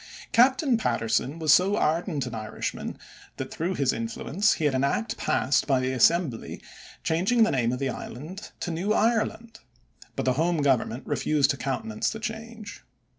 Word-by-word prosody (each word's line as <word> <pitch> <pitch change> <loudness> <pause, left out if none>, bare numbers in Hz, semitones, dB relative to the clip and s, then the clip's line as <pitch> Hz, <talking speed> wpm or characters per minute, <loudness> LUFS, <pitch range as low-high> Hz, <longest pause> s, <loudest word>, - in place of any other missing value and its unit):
Captain 260 +1 +4
Patterson 125 - 0
was 160 -2 +4
so 195 +3 +4
ardent 155 -3 0
an 125 - -6
Irishman 110 -1 -5 0.4
that - - -5
through 175 +4 -2
his 140 -4 +1
influence 135 - 0
he 155 - -2
had 145 - +2
an 130 +1 +1
act 210 +11 0
passed 130 -1 +1
by 135 -3 +3
the 130 0 -1
Assembly 130 0 +1 0.4
changing 190 +9 +2
the 220 - +2
name 120 -3 +1
of 125 - -2
the 135 0 -1
island 155 - -7
to 175 - -2
New 185 +6 0
Ireland, 225 0 0 0.6
but - - -2
the 130 - +3
home 160 +2 +1
Government 130 -2 +1
refused 145 -3 +1
to 140 - -4
countenance 215 - -2
the 220 - -6
change. 225 -1 -7
160 Hz, 170 wpm, -26 LUFS, 130-215 Hz, 0.6 s, Captain